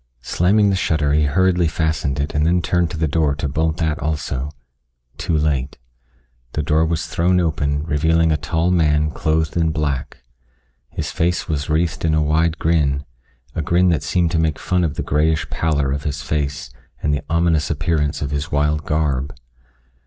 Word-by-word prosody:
Slamming 100 - +3
the - - +1
shutter 75 -5 +1
he 75 0 +3
hurriedly 90 +3 +2
fastened 80 -3 -1
it 70 +1 -2
and 75 - +1
then 85 +2 +2
turned 90 -1 +1
to 80 - -6
the 80 0 +1
door 75 -1 +1
to 75 0 -3
bolt 80 +3 0
that 80 -2 -1
also. 70 -3 -2 0.7
Too 80 - 0
late. 70 -3 -1 0.8
The 75 - -1
door 80 +1 +2
was 80 0 -1
thrown 90 +2 +1
open 75 -3 0
revealing 80 +2 +2
a - - +3
tall 80 +4 0
man 75 -3 +2
clothed 80 0 0
in 80 -1 +2
black. 70 -4 -3 0.7
His - - -4
face 85 +2 0
was 75 -1 -2
wreathed 80 +2 0
in 80 -1 +2
a 80 - +2
wide 80 +2 +1
grin 70 -4 +1 0.5
a - - -2
grin 90 +4 +3
that 80 -5 +1
seemed 85 +3 0
to 80 - +1
make 80 -2 +1
fun 90 -1 0
of 80 -4 -1
the - - -3
grayish 80 +2 +1
pallor 75 -4 0
of 70 +1 -2
his 70 -3 -3
face 70 -4 -2 0.3
and 75 - +1
the 70 - -1
ominous 80 -2 +2
appearance 75 -2 -1
of 70 - -3
his 75 +3 -3
wild 75 +1 +1
garb. 75 -3 0
80 Hz, 180 wpm, -20 LUFS, 75-80 Hz, 0.8 s, Slamming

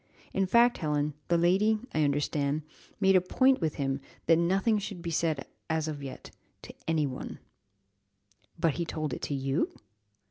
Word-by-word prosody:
In 195 -1 +1
fact, 235 +4 +4
Helen, 150 -2 0
the 170 - +3
lady, 195 +6 +3 0.2
I 155 - +1
understand, 145 +1 0 0.4
made 195 -1 +5
it - - +7
a - - +4
point 260 +8 +3
with 160 -2 0
him 135 -1 -1 0.2
that 165 0 +5
nothing 195 +6 +2
should 195 -4 -6
be 170 - -3
said 155 -3 0 0.2
of 160 -1 0
it - - -8
yet 135 - -8 0.3
to - - -9
any 160 -2 +2
one." 130 -2 -5 1.2
"But 165 -3 +1
he - - +2
told 155 -2 -3
it - - -5
to 145 - -2
you?" 135 +3 -1
160 Hz, 175 wpm, -29 LUFS, 145-190 Hz, 1.2 s, it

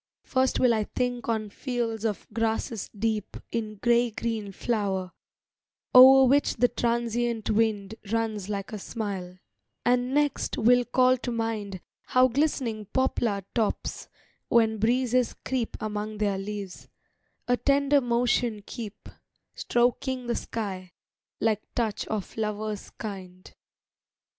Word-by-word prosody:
First 260 0 +1
will 250 -2 +5
I 215 -2 0
think 245 +1 -2
on 215 -2 -1
fields 230 -3 -3
of 210 -3 -2
grasses 225 -1 -1
deep 215 -1 -2
In 215 -2 -3
gray 240 +3 +3
green 220 -2 -3
flower, 195 -3 -1 0.8
o'er 265 +1 +10
which 280 +3 +3
the 245 +1 +3
transient 235 -1 -1
wind 215 -2 +1 0.2
Runs 220 -3 -1
like 200 0 -4
a 210 - -4
smile; 190 -4 -5 0.5
and 245 +1 +2
next 290 +1 0
will 245 +2 +4
call 255 +1 +4
to 245 - -3
mind 220 -5 -3 0.2
How 255 0 +4
glistening 250 -5 -1
poplar 220 -3 0
tops, 225 -3 -2 0.4
when 220 -2 +3
breezes 250 +2 +2
creep 255 -3 -2
Among 215 0 -4
their 205 -2 0
leaves, 200 -2 -6 0.6
a 245 - +4
tender 280 +2 +3
motion 240 -3 +1
keep, 225 -4 -8 0.5
Stroking 250 +1 0
the 240 -1 -1
sky, 190 -5 -5 0.5
like 215 -1 +1
touch 225 -4 -1
of 210 -3 -4
lovers 215 -1 -3
kind. 185 -4 -8
225 Hz, 125 wpm, -27 LUFS, 210-245 Hz, 0.8 s, o'er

